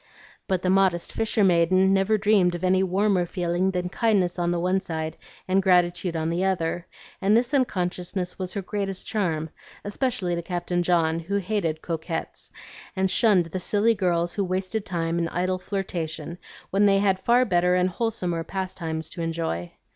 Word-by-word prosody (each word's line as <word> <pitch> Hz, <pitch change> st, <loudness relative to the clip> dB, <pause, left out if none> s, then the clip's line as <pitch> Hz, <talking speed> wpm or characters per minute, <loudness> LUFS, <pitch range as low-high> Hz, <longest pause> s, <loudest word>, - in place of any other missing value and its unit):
But 185 Hz, -2 st, 0 dB
the 185 Hz, -, +2 dB
modest 190 Hz, -3 st, +2 dB
fisher 220 Hz, -1 st, +1 dB
maiden 185 Hz, +1 st, +4 dB
never 195 Hz, +3 st, +2 dB
dreamed 200 Hz, -4 st, +3 dB
of 175 Hz, -, -7 dB
any 185 Hz, 0 st, +3 dB
warmer 190 Hz, -1 st, +1 dB
feeling 175 Hz, +1 st, 0 dB
than 180 Hz, -1 st, -2 dB
kindness 190 Hz, -5 st, +1 dB
on 175 Hz, 0 st, +1 dB
the 175 Hz, 0 st, 0 dB
one 185 Hz, +2 st, +1 dB
side 160 Hz, -2 st, -4 dB, 0.3 s
and 190 Hz, +1 st, +3 dB
gratitude 180 Hz, -1 st, +2 dB
on 160 Hz, 0 st, -1 dB
the 175 Hz, +2 st, 0 dB
other; 175 Hz, -2 st, -1 dB, 0.3 s
and 200 Hz, +3 st, +4 dB
this 245 Hz, +4 st, 0 dB
unconsciousness 180 Hz, -7 st, -1 dB
was 185 Hz, -1 st, -3 dB
her 200 Hz, -, -2 dB
greatest 195 Hz, -1 st, -3 dB
charm, 160 Hz, -7 st, -1 dB, 0.3 s
especially 205 Hz, -4 st, -1 dB
to 170 Hz, -, -2 dB
Captain 175 Hz, 0 st, -2 dB
John, 165 Hz, -2 st, +2 dB
who 180 Hz, +5 st, -4 dB
hated 185 Hz, -6 st, -2 dB
coquettes, 165 Hz, 0 st, -4 dB, 0.4 s
and 190 Hz, -1 st, +1 dB
shunned 205 Hz, -7 st, +4 dB
the 185 Hz, -, -3 dB
silly 210 Hz, +5 st, +2 dB
girls 175 Hz, -4 st, 0 dB
who 200 Hz, -, -1 dB
wasted 190 Hz, +3 st, -2 dB
time 170 Hz, -2 st, -1 dB
in 170 Hz, -, 0 dB
idle 185 Hz, +1 st, -1 dB
flirtation 170 Hz, -4 st, -4 dB, 0.3 s
when 200 Hz, +2 st, +4 dB
they 195 Hz, -1 st, +4 dB
had 195 Hz, -1 st, +2 dB
far 240 Hz, +5 st, +3 dB
better 180 Hz, -2 st, +2 dB
and 180 Hz, 0 st, +2 dB
wholesomer 180 Hz, -6 st, -2 dB
pastimes 165 Hz, -4 st, -4 dB
to 170 Hz, -, -7 dB
enjoy. 165 Hz, -, -3 dB
185 Hz, 170 wpm, -25 LUFS, 170-195 Hz, 0.4 s, maiden